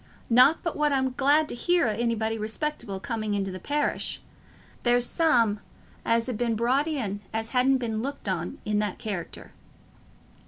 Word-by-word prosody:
Not 255 Hz, +7 st, +6 dB
but 335 Hz, -, -2 dB
what 300 Hz, -1 st, +1 dB
I'm 265 Hz, -1 st, +1 dB
glad 290 Hz, +4 st, +3 dB
to -, -, -4 dB
hear 350 Hz, +8 st, +2 dB
o' -, -, +1 dB
anybody 225 Hz, 0 st, -1 dB
respectable 220 Hz, -1 st, -4 dB
coming 215 Hz, 0 st, -3 dB
into 195 Hz, -1 st, -2 dB
the 185 Hz, -, -7 dB
parish; 295 Hz, +9 st, -1 dB, 0.6 s
there's 245 Hz, 0 st, +3 dB
some 235 Hz, -10 st, +3 dB, 0.4 s
as 230 Hz, 0 st, +2 dB
ha' 250 Hz, -, -2 dB
been 230 Hz, 0 st, 0 dB
brought 255 Hz, +7 st, +1 dB
in 220 Hz, -10 st, -2 dB
as 225 Hz, 0 st, -3 dB
hasn't 265 Hz, +1 st, +3 dB
been 225 Hz, -3 st, -2 dB
looked 280 Hz, -1 st, -5 dB
on 175 Hz, -3 st, -2 dB
i' 210 Hz, -, -2 dB
that 210 Hz, -2 st, 0 dB
character." 195 Hz, -6 st, -6 dB
235 Hz, 165 wpm, -26 LUFS, 215-270 Hz, 0.6 s, Not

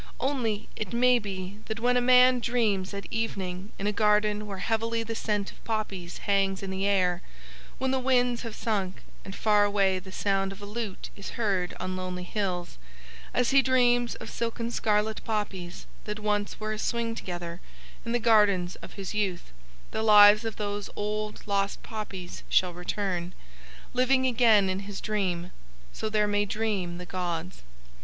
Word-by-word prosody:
Only 235 Hz, -6 st, -1 dB
it 215 Hz, -2 st, -4 dB
may 250 Hz, +1 st, +5 dB
be 195 Hz, -1 st, -6 dB
that 220 Hz, +1 st, -3 dB
when 245 Hz, +2 st, +2 dB
a 245 Hz, -, +4 dB
man 250 Hz, 0 st, +6 dB
dreams 220 Hz, -6 st, 0 dB
at 200 Hz, 0 st, -6 dB
evening 195 Hz, -4 st, -3 dB
in 195 Hz, -, -4 dB
a 210 Hz, -, +2 dB
garden 210 Hz, 0 st, +2 dB
where 195 Hz, -1 st, -5 dB
heavily 230 Hz, +3 st, 0 dB
the 225 Hz, 0 st, -4 dB
scent 210 Hz, -3 st, -1 dB
of -, -, -20 dB
poppies 200 Hz, -6 st, -3 dB
hangs 195 Hz, -1 st, +1 dB
in 195 Hz, -, -4 dB
the 190 Hz, +1 st, -1 dB
air, 180 Hz, -3 st, +2 dB, 0.6 s
when 265 Hz, 0 st, 0 dB
the 265 Hz, -, +1 dB
winds 250 Hz, -2 st, +2 dB
have 230 Hz, -3 st, -6 dB
sunk, 195 Hz, -5 st, -2 dB, 0.2 s
and 195 Hz, -, -8 dB
far 210 Hz, -1 st, +4 dB
away 195 Hz, -2 st, +2 dB
the 190 Hz, +1 st, -12 dB
sound 195 Hz, 0 st, 0 dB
of 195 Hz, -, -10 dB
a 205 Hz, -, -8 dB
lute 210 Hz, -2 st, -5 dB
is 200 Hz, -, -8 dB
heard 195 Hz, -6 st, 0 dB
on 185 Hz, +1 st, -3 dB
lonely 185 Hz, -1 st, -4 dB
hills, 180 Hz, -, -3 dB, 0.5 s
as 250 Hz, -, +1 dB
he 275 Hz, 0 st, +7 dB
dreams 245 Hz, -2 st, +3 dB
of -, -, -8 dB
silken 230 Hz, 0 st, -3 dB
scarlet 215 Hz, -1 st, 0 dB
poppies 195 Hz, -5 st, -3 dB, 0.2 s
that 210 Hz, 0 st, -3 dB
once 210 Hz, -1 st, -1 dB
were 215 Hz, 0 st, -2 dB
a 215 Hz, -, -5 dB
swing 230 Hz, 0 st, -1 dB
together 175 Hz, -4 st, -6 dB, 0.4 s
in 230 Hz, -, -4 dB
the 240 Hz, -, +3 dB
gardens 210 Hz, -6 st, +3 dB
of -, -, -11 dB
his 195 Hz, -1 st, -5 dB
youth, 195 Hz, -, -2 dB, 0.4 s
the -, -, -2 dB
lives 210 Hz, 0 st, +8 dB
of 225 Hz, -, -3 dB
those 205 Hz, -1 st, -3 dB
old 210 Hz, 0 st, -3 dB
lost 200 Hz, -1 st, -1 dB
poppies 200 Hz, -5 st, -6 dB
shall 180 Hz, -1 st, +3 dB
return, 180 Hz, 0 st, -3 dB, 0.6 s
living 260 Hz, +1 st, +3 dB
again 230 Hz, -5 st, +5 dB
in 190 Hz, 0 st, -1 dB
his 200 Hz, 0 st, -6 dB
dream. 185 Hz, -4 st, -2 dB, 0.4 s
_So 220 Hz, -, -3 dB
there 210 Hz, -1 st, +3 dB
may 205 Hz, 0 st, +1 dB
dream 200 Hz, -4 st, -2 dB
the 180 Hz, -, -7 dB
gods. 175 Hz, -1 st, -4 dB
210 Hz, 175 wpm, -28 LUFS, 190-225 Hz, 0.6 s, lives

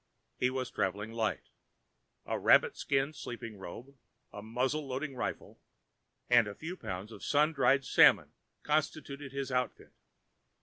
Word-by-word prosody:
He 125 Hz, -, +3 dB
was 130 Hz, -1 st, -3 dB
travelling 105 Hz, +4 st, -2 dB
light. 115 Hz, -2 st, -2 dB, 0.8 s
A -, -, -2 dB
rabbit -, -, +5 dB
skin 140 Hz, +2 st, 0 dB
sleeping 115 Hz, -7 st, -7 dB
robe, 125 Hz, +9 st, -9 dB, 0.4 s
a 105 Hz, -, -7 dB
muzzle 130 Hz, +7 st, -1 dB
loading 135 Hz, +2 st, -4 dB
rifle, -, -, -5 dB, 0.7 s
and 120 Hz, -3 st, +5 dB
a 100 Hz, -, -6 dB
few 165 Hz, +3 st, -6 dB
pounds 95 Hz, -, -6 dB
of -, -, -11 dB
sun 150 Hz, +2 st, +3 dB
dried 135 Hz, -1 st, +3 dB
salmon -, -, +5 dB, 0.3 s
constituted 145 Hz, -2 st, -2 dB
his 135 Hz, -1 st, -4 dB
outfit. 125 Hz, 0 st, -2 dB
130 Hz, 135 wpm, -32 LUFS, 115-140 Hz, 0.8 s, rabbit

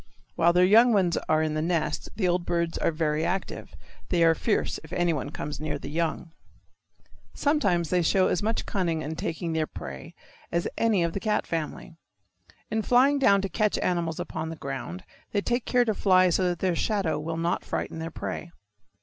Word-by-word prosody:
While 170 Hz, +1 st, +4 dB
their 180 Hz, +1 st, +4 dB
young 230 Hz, +5 st, +6 dB
ones 185 Hz, -4 st, +2 dB
are 155 Hz, 0 st, +3 dB
in 155 Hz, -1 st, -1 dB
the 155 Hz, -, -1 dB
nest 160 Hz, -2 st, -1 dB
the 190 Hz, -4 st, 0 dB
old 175 Hz, 0 st, +1 dB
birds 170 Hz, -1 st, -1 dB
are -, -, +2 dB
very 155 Hz, -1 st, 0 dB
active. 185 Hz, +3 st, -3 dB, 0.3 s
They 175 Hz, -2 st, +3 dB
are 165 Hz, 0 st, +6 dB
fierce 205 Hz, +6 st, -1 dB
if 160 Hz, -, -14 dB
anyone 170 Hz, -6 st, 0 dB
comes 150 Hz, 0 st, -5 dB
near 150 Hz, -1 st, -3 dB
the 140 Hz, -, -8 dB
young. 165 Hz, +1 st, -2 dB, 1.0 s
Sometimes 200 Hz, -, +1 dB
they 180 Hz, -1 st, +3 dB
show 185 Hz, +3 st, +3 dB
as -, -, 0 dB
much 225 Hz, +2 st, -1 dB
cunning 170 Hz, -5 st, -1 dB
in 155 Hz, +3 st, -4 dB
taking 165 Hz, +1 st, -3 dB
their 160 Hz, -1 st, 0 dB
prey 65 Hz, 0 st, -9 dB, 0.4 s
as 170 Hz, 0 st, 0 dB
any 215 Hz, -6 st, +2 dB
of 170 Hz, -1 st, -1 dB
the -, -, -2 dB
cat 210 Hz, 0 st, 0 dB
family. 165 Hz, 0 st, -5 dB, 0.7 s
In 220 Hz, -, +1 dB
flying 260 Hz, +5 st, +4 dB
down 200 Hz, -7 st, +4 dB
to -, -, 0 dB
catch 215 Hz, +3 st, +1 dB
animals 170 Hz, -3 st, -1 dB
upon 160 Hz, -, -4 dB
the 165 Hz, -, -5 dB
ground 140 Hz, +5 st, -6 dB, 0.3 s
they 205 Hz, -, +2 dB
take 240 Hz, +3 st, -1 dB
care 245 Hz, -1 st, +3 dB
to 220 Hz, -, +1 dB
fly 185 Hz, -2 st, +4 dB
so 185 Hz, +2 st, +2 dB
that 175 Hz, -, -2 dB
their 185 Hz, -1 st, 0 dB
shadow 195 Hz, -5 st, 0 dB
will 160 Hz, +2 st, -4 dB
not 170 Hz, +2 st, -1 dB
frighten 160 Hz, -, -4 dB
their 165 Hz, 0 st, -4 dB
prey. 170 Hz, +1 st, -6 dB
170 Hz, 195 wpm, -26 LUFS, 160-200 Hz, 1.0 s, young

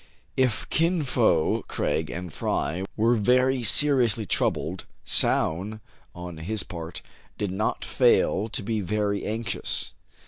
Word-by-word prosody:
If 130 Hz, -5 st, 0 dB
Kin 165 Hz, 0 st, +1 dB
Fo, 110 Hz, -, +2 dB
Craig, 80 Hz, -1 st, -1 dB
and 90 Hz, -2 st, -6 dB
Fry 90 Hz, +5 st, -2 dB
were 115 Hz, +2 st, +3 dB
very 125 Hz, +3 st, +2 dB
seriously 120 Hz, -2 st, +4 dB
troubled, -, -, -1 dB, 0.2 s
Soun, 100 Hz, +7 st, +1 dB, 0.4 s
on 90 Hz, -1 st, -8 dB
his 100 Hz, +7 st, -1 dB
part, 85 Hz, -1 st, -7 dB, 0.3 s
did 100 Hz, -3 st, -2 dB
not 100 Hz, +3 st, -2 dB
fail 110 Hz, +3 st, +2 dB
to 110 Hz, -, -2 dB
be 110 Hz, +1 st, -1 dB
very 100 Hz, +1 st, -1 dB
anxious. 110 Hz, -2 st, -2 dB
105 Hz, 125 wpm, -25 LUFS, 90-120 Hz, 0.4 s, seriously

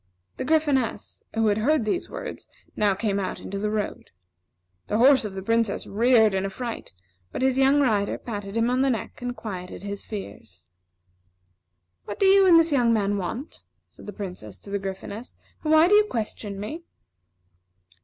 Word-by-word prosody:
The -, -, -3 dB
Gryphoness, 290 Hz, -5 st, 0 dB
who 225 Hz, 0 st, +2 dB
had 210 Hz, 0 st, +2 dB
heard 280 Hz, +1 st, +2 dB
these 280 Hz, +11 st, -2 dB
words, -, -, -7 dB, 0.3 s
now 205 Hz, -2 st, +2 dB
came 200 Hz, -1 st, -1 dB
out 190 Hz, -, -3 dB
into 200 Hz, +1 st, -6 dB
the 210 Hz, +1 st, -1 dB
road. 210 Hz, -1 st, -3 dB, 0.8 s
The 210 Hz, -, 0 dB
horse 260 Hz, 0 st, +5 dB
of 200 Hz, -2 st, -6 dB
the 190 Hz, -, -5 dB
Princess 230 Hz, 0 st, 0 dB
reared 220 Hz, 0 st, +4 dB
in 190 Hz, 0 st, 0 dB
affright, 230 Hz, +4 st, -5 dB, 0.4 s
but -, -, -3 dB
his 265 Hz, 0 st, +2 dB
young 270 Hz, +2 st, +4 dB
rider 210 Hz, -7 st, +1 dB
patted 205 Hz, -2 st, -6 dB
him 230 Hz, +2 st, +2 dB
on 255 Hz, +1 st, +1 dB
the 270 Hz, -, +3 dB
neck, 235 Hz, -1 st, -4 dB
and 245 Hz, 0 st, -4 dB
quieted 185 Hz, -5 st, -7 dB
his 200 Hz, 0 st, -5 dB
fears. 100 Hz, -, -9 dB, 1.4 s
"What 205 Hz, -, -7 dB
do 395 Hz, -, +3 dB
you 390 Hz, 0 st, +6 dB
and 340 Hz, -2 st, +8 dB
this 330 Hz, 0 st, +2 dB
young 245 Hz, -5 st, +3 dB
man 205 Hz, -2 st, +1 dB
want?" 225 Hz, -, -5 dB, 0.2 s
said -, -, -16 dB
the -, -, -4 dB
Princess 180 Hz, -, -8 dB
to 200 Hz, -, -11 dB
the 200 Hz, -, -1 dB
Gryphoness, 195 Hz, +4 st, -7 dB, 0.3 s
"and 310 Hz, -, 0 dB
why 315 Hz, +2 st, +6 dB
do 400 Hz, -, +3 dB
you 420 Hz, 0 st, +6 dB
question 215 Hz, -, -4 dB
me?" 260 Hz, +12 st, -5 dB
220 Hz, 180 wpm, -25 LUFS, 200-265 Hz, 1.4 s, and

